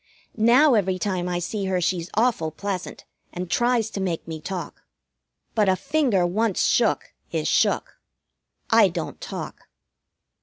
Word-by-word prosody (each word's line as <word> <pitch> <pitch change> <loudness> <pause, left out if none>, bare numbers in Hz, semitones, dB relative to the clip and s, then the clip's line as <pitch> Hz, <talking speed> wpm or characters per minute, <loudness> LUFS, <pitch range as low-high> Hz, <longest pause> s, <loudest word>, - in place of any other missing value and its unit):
Now 245 +6 +5
every 190 -4 +2
time 180 -1 -2
I 175 - -1
see 195 +4 -3
her 190 -1 0
she's 175 -1 -1
awful 220 -8 +2
pleasant, 185 +3 -5 0.3
and 180 -1 -6
tries 240 -2 +1
to 195 - -4
make 175 -4 -3
me 160 -1 -6
talk. 180 0 -6 0.7
But 210 -3 +3
a 190 - +4
finger 225 - +1
once 205 +3 0
shook - - +1 0.2
is - - -1
shook. - - +1 0.7
I - - +7
don't - - -5
talk. - - -7
190 Hz, 145 wpm, -24 LUFS, 175-220 Hz, 0.7 s, I